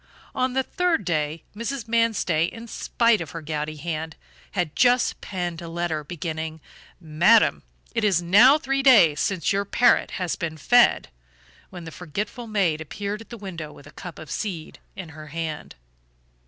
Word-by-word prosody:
On 255 0 0
the 265 0 +1
third 360 +1 0
day, 155 -2 -1
Mrs. 230 +2 -4
Manstey, 225 -8 +2
in 230 0 -10
spite 230 -1 +1
of 165 - -6
her - - -6
gouty 155 0 -3
hand, 160 +1 -5 0.4
had 175 -6 -2
just 245 0 +3
penned 175 -3 -4
a 170 - -7
letter, 165 -2 -2
beginning: 160 0 -5 0.4
"Madam, 170 - +4 0.3
it - - -1
is 195 -5 +3
now 210 - +6
three 275 -3 -1
days 205 - +6
since 195 -2 0
your 200 +1 +1
parrot 240 +4 +3
has 180 -3 -2
been 160 -3 -4
fed," 245 +11 +4 0.6
when 180 -2 -9
the 165 - -8
forgetful 205 - -5
maid 185 -8 0
appeared 205 +7 -5
at 225 - -14
the 235 - -8
window 170 -7 -7
with 145 - -15
a - - -13
cup 175 -3 -9
of 160 - -10
seed 180 -7 -5 0.2
in 185 -4 -8
her 155 0 -11
hand. 160 0 -5
175 Hz, 170 wpm, -24 LUFS, 160-225 Hz, 0.6 s, now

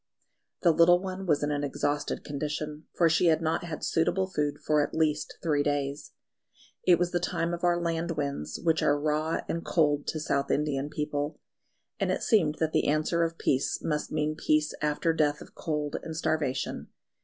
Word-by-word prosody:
The 170 - +6
little 170 +2 +6
one 190 0 -5
was 150 -3 +2
in 145 - 0
an 145 0 -1
exhausted 145 +1 -2
condition, 150 +1 -4
for 170 - +3
she 170 +2 +3
had 160 -1 +4
not 160 0 -1
had 160 -3 -6
suitable 175 +3 +1
food 150 -6 -2
for 150 -1 +2
at 145 - -2
least 155 -2 0
three 150 -3 +2
days. 145 0 -2 0.7
It 175 -2 +5
was 175 0 0
the 175 - +1
time 170 0 -1
of 175 - -5
our 175 -1 +3
land 170 0 -1
winds, 140 - -3
which 160 -2 +2
are 145 0 +3
raw 155 +2 0
and 165 - -2
cold 145 -3 +1
to 155 - -2
South 140 -2 -1
Indian 145 -1 0
people; 150 0 -3 0.6
and - - +1
it - - -1
seemed 165 -10 +3
that 160 0 -1
the - - +1
answer 155 +3 +2
of 165 0 -2
peace 130 0 +1
must 150 -2 -2
mean 155 0 0
peace 155 0 +1
after 150 +2 +1
death 150 -2 +1
of - - -13
cold 150 -2 -2
and 160 -1 -6
starvation. 145 -5 -1
155 Hz, 190 wpm, -28 LUFS, 145-165 Hz, 0.7 s, The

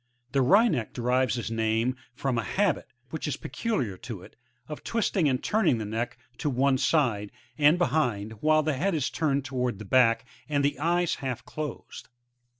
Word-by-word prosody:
The 135 - +2
Wryneck 195 - +3
derives 125 0 +1
its 115 -1 -4
name 115 +2 +1 0.2
frotn 130 -4 0
a - - -1
habit, 195 - 0 0.2
which 160 - -4
is 150 - -2
peculiar 130 - -2
to 100 -3 -8
it, - - -15 0.3
of 150 - -7
twisting 200 -8 +1
and 130 -1 -1
turning 215 - +2
the 110 - -3
neck 115 +1 -3 0.2
to 150 - 0
one 135 0 +2
side, 115 -12 +1 0.2
and 150 +4 +5
behind, 125 - 0
while 155 0 +4
the 155 0 +1
head 175 +7 0
is 145 -5 -1
turned 140 -4 0
towards 125 -5 -2
the 110 - -8
back 115 +1 +4 0.2
and 145 -1 +1
the 140 -1 0
eyes 175 +2 +1
Half 130 -3 -4
closed. 155 -1 -7
135 Hz, 175 wpm, -27 LUFS, 115-155 Hz, 0.3 s, and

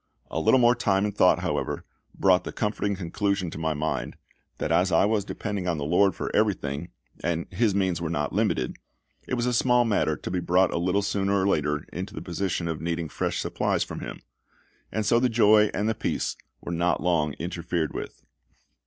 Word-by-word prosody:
A 80 - -1
little 105 +11 +4
more 120 0 +6
time 100 -4 +1
and 105 - -3
thought, - - +4
however, - - -2 0.3
brought 95 -1 +4
the - - -5
comforting 105 -1 -1
conclusion 95 0 -1
to - - -7
my 80 -1 -1
mind, 75 +2 -2 0.4
that 75 - -2
as 90 +3 +3
I 85 +3 +4
was 105 -1 +1
depending 100 -2 -4
on 85 -2 0
the 70 - -3
LORD 95 +5 +3
for - - -4
everything, 85 -7 0 0.3
and 85 0 -1
His 100 +2 +1
means 95 -4 0
were 80 - -2
not 75 -4 -2
limited, 65 -1 0 0.5
it - - -1
was 120 -1 -1
a 125 - +1
small 125 0 +3
matter 110 -3 +1
to - - -6
be 90 - 0
brought 90 +1 +2
a - - 0
little 90 +3 +1
sooner 100 0 +1
or 95 - +1
later 75 -4 0
into 95 +4 -5
the - - -5
position 85 -1 -2
of 80 -2 -3
needing 85 -1 -2
fresh - - -2
supplies - - 0
from - - -7
Him; - - -7 0.7
and 110 -1 -1
so 115 +3 +4
the 125 +1 +2
joy 105 -2 +5
and 105 +2 -1
the 110 - +2
peace - - -2 0.3
were - - -6
not 85 +1 0
long 80 -5 +1
interfered 85 -1 -3
with. - - -7
95 Hz, 205 wpm, -26 LUFS, 85-105 Hz, 0.7 s, more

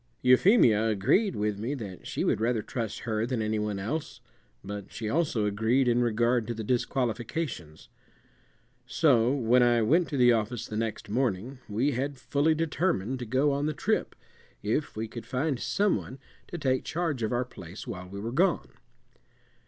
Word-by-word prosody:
Euphemia 125 - +5
agreed 135 - +2
with 105 -1 -1
me 120 +7 -2
that 100 -8 -8
she - - -2
would - - +1
rather 115 -1 +1
trust 115 -2 -4
her 110 -2 -1
than 120 0 -1
any 110 0 0
one 105 -1 -2
else, 115 +5 -4 0.4
but 100 0 -7
she 110 - -5
also 135 -5 +1
agreed 115 +6 +2
in 120 0 +3
regard 120 0 +1
to 120 - -3
the 110 - -5
disqualifications. 120 - -2 1.0
So 125 -7 +3
when 125 -2 +3
I 120 -1 +4
went 165 +10 +3
to 145 - -2
the 125 -1 +6
office 115 +1 -2
the 105 - -7
next 110 0 -3
morning 120 +2 -1
we 120 +8 +1
had 140 +2 -2
fully 145 +4 +1
determined 155 - -1
to 120 - -5
go 135 +5 +2
on 140 +2 0
the 155 - -1
trip, - - -1 0.5
if 115 +9 -1
we 110 +1 -3
could 115 0 -9
find 135 +1 -1
some 205 +7 +1
one 130 - -8 0.3
to 175 - -6
take 130 -4 0
charge 160 -6 -2
of 110 - -1
our 125 +1 0
place 95 -5 -10
while 90 -1 -7
we 100 +1 -7
were 115 +3 -4
gone. 175 +7 +1
120 Hz, 175 wpm, -28 LUFS, 110-140 Hz, 1.0 s, the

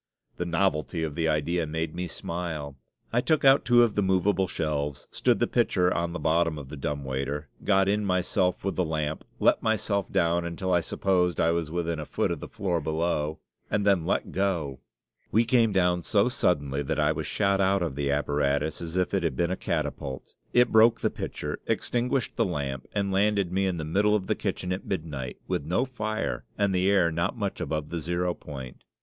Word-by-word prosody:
The 90 - -2
novelty 85 -2 0
of 80 -2 -2
the 80 +1 0
idea 80 +2 0
made 80 +1 -3
me 90 +1 -3
smile. 80 -5 -5 0.4
I 120 - +3
took 155 +1 +1
out 135 +1 +7
two 120 0 +6
of 115 -3 +2
the 105 - +1
movable 95 0 +2
shelves, 75 -4 -2
stood - - +2
the - - +2
pitcher 90 0 +2
on 85 0 -1
the 90 - -4
bottom 80 -1 +1
of 70 -3 -8
the 75 - -7
dumb 70 0 -3
waiter, 70 +2 -3
got 95 -2 +3
in 105 +1 +1
myself 90 -1 +1
with 95 - -1
the 90 - +1
lamp; 80 -2 -2 0.2
let - - +4
myself 100 -3 0
down, 85 +1 +2
until 85 +2 -2
I 90 - +5
supposed 90 0 0
I 85 - +3
was 85 -2 -1
within 85 -1 -2
a 75 - -6
foot - - 0
of - - -3
the - - -7
floor 90 -4 -2
below, 80 0 -1 0.3
and 105 -1 0
then 95 -5 +4
let - - -1
go! 85 -9 -1 0.5
We 115 +2 +4
came 115 -2 +3
down 90 -2 +2
so 105 +5 +3
suddenly 70 - 0
that 70 - -2
I 75 0 +3
was 80 - -3
shot 100 -1 +1
out 95 -1 +2
of 80 -6 -3
the 70 0 -1
apparatus 70 +1 0
as 85 0 -6
if 90 +1 0
it 100 - +2
had 85 - -1
been 85 0 0
a - - 0
catapult; 65 -7 -4 0.2
it 125 0 +4
broke 110 +1 +5
the - - +1
pitcher, - - -5
extinguished 125 +1 -1
the - - +3
lamp, 70 -7 -3
and 100 -1 -1
landed 100 -1 +2
me 95 +1 +1
in 90 -2 -1
the 80 - -4
middle 105 +6 +2
of 100 -3 -1
the - - +1
kitchen 90 0 -3
at 90 - -5
midnight, 75 -9 -4
with - - -1
no 90 - +1
fire 110 -4 -3
and 100 -2 +2
the 95 +1 +2
air 90 -4 +4
not 85 +8 -1
much 100 -3 -3
above 75 -1 -2
the 85 - -3
zero 85 +2 -1
point. 65 -7 -9
85 Hz, 210 wpm, -27 LUFS, 75-100 Hz, 0.5 s, out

